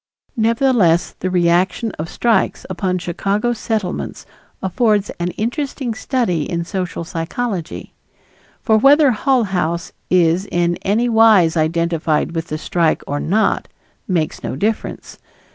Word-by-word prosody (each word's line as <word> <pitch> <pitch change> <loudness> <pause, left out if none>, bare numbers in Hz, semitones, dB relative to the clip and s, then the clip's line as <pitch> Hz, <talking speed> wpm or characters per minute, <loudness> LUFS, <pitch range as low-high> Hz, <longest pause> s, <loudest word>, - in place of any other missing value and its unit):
Nevertheless 225 -7 +2
the 185 - -2
reaction 180 +5 +1
of 155 - -4
strikes 230 -5 0
upon 185 0 -1
Chicago 200 +6 -1
Settlements 220 -5 -3 0.3
affords 210 +1 +1
an 175 - -1
interesting 250 +1 -2
study 220 - -1
in 170 -1 -2
social 180 -2 -4
psychology. 175 +2 -4 0.7
For 220 -3 +4
whether 280 +3 +6
Hull 250 +2 +2
House 175 -4 -2 0.2
is 180 +1 +2
in 175 0 +1
any 215 +5 0
wise 220 -8 +5
identified 165 0 0
with 165 0 -3
the 155 - -3
strike 165 0 0
or 145 +1 -3
not, 215 +9 +1 0.4
makes 170 -5 -1
no - - -4
difference. 215 +9 -3
185 Hz, 125 wpm, -18 LUFS, 170-225 Hz, 0.7 s, whether